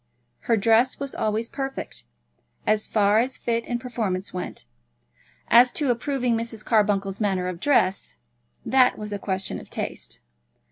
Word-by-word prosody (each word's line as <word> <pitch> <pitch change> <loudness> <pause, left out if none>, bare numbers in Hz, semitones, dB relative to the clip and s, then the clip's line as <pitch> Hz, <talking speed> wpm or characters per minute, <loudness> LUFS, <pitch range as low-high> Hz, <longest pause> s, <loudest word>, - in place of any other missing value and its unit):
Her 230 - +5
dress 225 +4 +3
was 280 -1 -4
always 215 +2 -1
perfect, 270 - -5 0.6
as 215 0 +1
far 210 0 +3
as 255 +3 -1
fit 230 -1 -1
and 240 -1 -2
performance 215 -7 -3
went. 180 - -6 0.8
As 245 +1 +7
to 290 -5 +1
approving 250 -1 0
Mrs. 225 -1 -4
Carbuncle's 205 -2 +1
manner 190 -3 0
of 180 -2 -4
dress, 190 - +1 0.5
that 255 -1 +4
was 210 -1 -5
a 200 - -3
question 190 -1 -3
of - - -13
taste. - - -5
225 Hz, 145 wpm, -24 LUFS, 195-245 Hz, 0.8 s, As